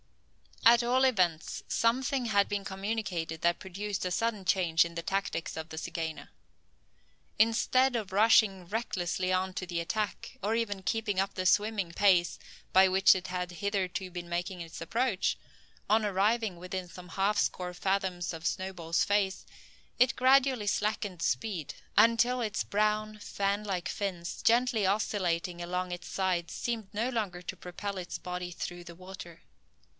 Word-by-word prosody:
At 235 +1 +8
all 255 +2 +3
events 185 -11 +1
something 255 +2 +1
had 200 -3 +3
been 205 -1 -2
communicated 190 -5 -3
that 170 0 +2
produced 195 +1 -4
a - - 0
sudden 215 +1 -1
change 170 -3 +3
in 170 0 -8
the 170 - -2
tactics 195 -3 -2
of 160 +1 -5
the 160 - -8
zygaena. 160 -3 -4 1.1
Instead 245 +4 +3
of 210 -5 -3
rushing 205 -3 +4
recklessly 185 -3 -2
on 185 0 0
to 180 - -4
the 170 -1 -2
attack, 210 +5 -3
or 210 +3 0
even 205 -4 -1
keeping 205 0 -1
up 195 +1 0
the 185 - -3
swimming 205 -2 +2
pace 180 -1 +3 0.3
by 190 +1 +7
which 190 +1 +6
it 185 -1 -4
had 180 0 -3
hitherto 190 +1 -2
been 175 -1 -7
making 175 +1 -3
its 165 0 -8
approach, 225 +3 0 0.5
on 220 +1 +4
arriving 205 +1 +1
within 180 +1 -5
some 180 0 -12
half 195 +4 +1
score 180 -2 -1
fathoms 185 -1 -1
of 160 0 -8
Snowball's 175 -3 -1
face, 200 -2 0 0.5
it 255 +2 +4
gradually 260 -3 +4
slackened 205 -3 -1
speed, 175 -2 -2 0.2
until 230 +4 +4
its 210 -5 -1
brown, 215 +1 0
fan 200 0 -1
like 185 -3 -3
fins, 180 -4 -4
gently 235 -2 +3
oscillating 180 -4 0
along 180 +1 -3
its 175 0 -6
sides 180 -3 -1
seemed 225 -5 -3
no 225 +4 0
longer 205 -8 -2
to 180 +1 -6
propel 195 +3 -6
its 180 -1 -5
body 180 0 -5
through 175 0 -6
the 170 -1 -10
water. 185 -2 -10
190 Hz, 155 wpm, -30 LUFS, 175-215 Hz, 1.1 s, At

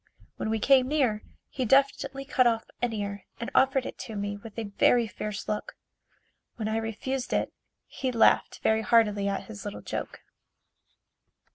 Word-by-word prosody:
When - - -2
we 220 - +1
came 255 +3 +4
near, 260 -8 +1 0.3
he 260 - -3
deftly 275 +1 +2
cut 255 -2 +3
off 225 -1 +1 0.2
an 245 -1 +1
ear 200 -2 -4
and 235 - -4
offered 265 -1 +3
it - - -7
to 220 - -7
me 205 0 -3
with 210 +2 -11
a 230 - -2
very 225 +3 +3
fierce 210 0 -6
look. 210 0 -3 0.8
When 220 -2 -3
I 220 +1 0
refused 235 +4 -3
it, - - 0 0.3
he 260 -2 -3
laughed 230 -2 +3
very 220 0 +3
heartily 210 -3 +3
at 200 0 -1
his 205 -3 -9
little 205 - -6
joke. - - -5
225 Hz, 165 wpm, -28 LUFS, 210-255 Hz, 0.8 s, came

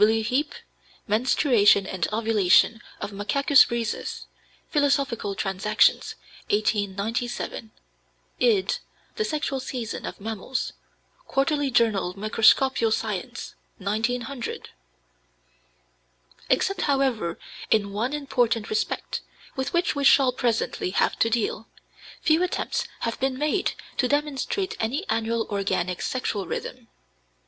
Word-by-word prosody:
(W. 220 +1 +4
Heape, 265 +7 -1 0.5
"Menstruation 215 -2 +4
and 185 -3 -2
Ovulation 220 0 +3 0.2
of - - -5
Macacus 275 +8 +4
rhesus," 235 -2 -3 0.5
Philosophical 275 -8 +1
Transactions, 195 +3 +2 0.3
1897; 215 +3 -1 0.7
id. 205 -6 +2 0.4
"The 435 - +1
Sexual 295 -5 -2
Season 245 -3 -5
of - - -7
Mammals," 220 +4 -4 0.5
Quarterly 285 +1 +1
Journal 215 -7 +2
Microscopical 225 +3 +3
Science, 225 +2 -3 0.2
1900.) 235 +5 -3 1.8
Except, 390 - +1
however, 265 - +1 0.3
in 200 -2 +2
one 235 +7 -1
important 245 -6 0
respect, 435 +1 -2 0.3
with 265 -1 -2
which 345 -2 +1
we 285 - -1
shall 270 -2 +6
presently 240 -6 -1
have 190 - +1
to 225 - +3
deal, 225 0 -1 0.6
few 315 +1 +4
attempts 365 - -1
have 230 -1 -2
been 265 0 0
made 305 +7 0 0.2
to 250 - +2
demonstrate 295 - -1
any 270 - -2
annual 225 0 0
organic 195 -3 -1
sexual 210 -6 -2
rhythm. 250 -2 -5
230 Hz, 105 wpm, -25 LUFS, 210-275 Hz, 1.8 s, shall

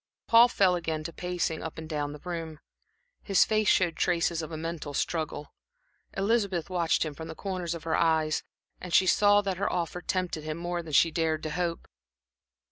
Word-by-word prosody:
Paul 230 +1 +7
fell 195 -6 +3
again 160 -3 -3
to 165 +1 -6
pacing 180 -3 -2
up 160 - -6
and 160 0 -7
down 145 -2 -2
the 150 - -8
room. 165 -3 -5 0.6
His 195 -3 +4
face 215 -1 +1
showed 175 -5 +3
traces 170 -1 +1
of 160 - -7
a 160 - -4
mental 160 -3 -5
struggle. 155 -2 -3 0.6
Elizabeth 195 -4 0
watched 170 -2 +1
him 155 - -4
from 160 +3 -8
the 160 - -7
corners 180 -3 -3
of 165 - -8
her 165 - 0
eyes; 160 -2 +2 0.5
she 185 - +5
saw 205 +2 +5
that 195 -3 -3
her 200 - -1
offer 175 0 -2
tempted 180 -4 -2
him 155 0 -4
more 175 0 -3
than 160 -3 -9
she 165 +4 +5
had - - -15
dared 160 -2 0
to 155 - -3
hope. 170 0 -2
170 Hz, 195 wpm, -28 LUFS, 160-185 Hz, 0.6 s, Paul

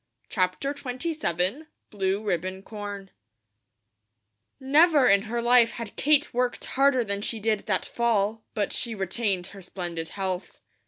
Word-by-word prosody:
'" - - -44
CHAPTER 185 +8 0
XXVII 260 - -1 0.2
BLUE 195 0 -1
RIBBON 185 -1 -2
CORN 205 -2 -7 1.5
NEVER 290 +1 +5
in 200 0 +5
her 235 +1 -2
life 240 -1 +5
had 230 -3 -7
Kate 295 0 +2
worked 250 0 -1
harder 270 -2 +3
than 200 -2 -1
she 225 +2 -3
did 215 -1 -1
that 190 -3 +1
fall; 220 -2 0
but 205 -2 -1
she 230 -2 -1
retained 195 -1 -1
her 195 - -10
splendid 175 -3 -5
health. 190 -2 -4
210 Hz, 140 wpm, -26 LUFS, 190-250 Hz, 1.5 s, NEVER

